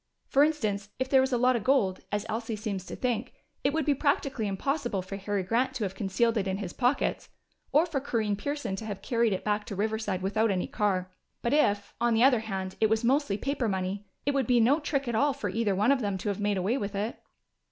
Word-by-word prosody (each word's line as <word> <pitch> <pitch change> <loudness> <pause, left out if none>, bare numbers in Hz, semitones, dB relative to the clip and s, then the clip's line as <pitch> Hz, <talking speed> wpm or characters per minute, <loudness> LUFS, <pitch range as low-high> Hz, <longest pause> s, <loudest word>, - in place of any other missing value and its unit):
For 275 - +4
instance, 215 -10 0
if 260 0 -2
there 265 -1 +6
was 265 +1 0
a 245 - +2
lot 250 +1 +4
of 230 - -1
gold, 235 -8 +2
as 205 0 -1
Elsie 225 0 -3
seems 200 -3 -4
to - - -6
think, 245 -1 -2 0.3
it 275 - +3
would 320 -1 0
be 295 - +4
practically 275 -5 0
impossible 240 0 -1
for 195 +2 -6
Harry 200 0 -2
Grant 250 +7 0
to 235 - -2
have 190 -2 -2
concealed 220 +4 +1
it 195 -2 0
in 190 0 -1
his 195 -4 -5
pockets, 255 +2 0 0.4
or 305 +4 +5
for 320 -5 -2
Corinne 220 -6 -1
Pearson 285 -1 -3
to 220 - -6
have 200 -2 -6
carried 235 -3 +2
it 190 - -2
back 210 0 0
to 200 - -6
Riverside 205 -2 -1
without 215 +3 +1
any 185 -2 0
car. 185 -3 -1 0.3
But 235 - +1
if, 205 -9 +2
on 240 -1 +3
the 225 - +4
other 260 -3 +6
hand, 190 -4 -4
it 220 - +4
was 220 +1 +1
mostly 255 -4 +2
paper 275 0 -1
money, 190 0 -2 0.2
it 285 - +2
would 270 -4 +1
be 245 -1 +4
no 255 +7 +4
trick 280 -3 -1
at 240 - -1
all 280 +5 +3
for 210 -8 -3
either 215 -2 +1
one 210 +7 +3
of 275 -2 +2
them 200 -3 -1
to 205 - -3
have 200 - -2
made 205 -1 +1
away 205 +9 0
with 200 0 -4
it." 210 +4 -3
220 Hz, 245 wpm, -28 LUFS, 200-260 Hz, 0.4 s, there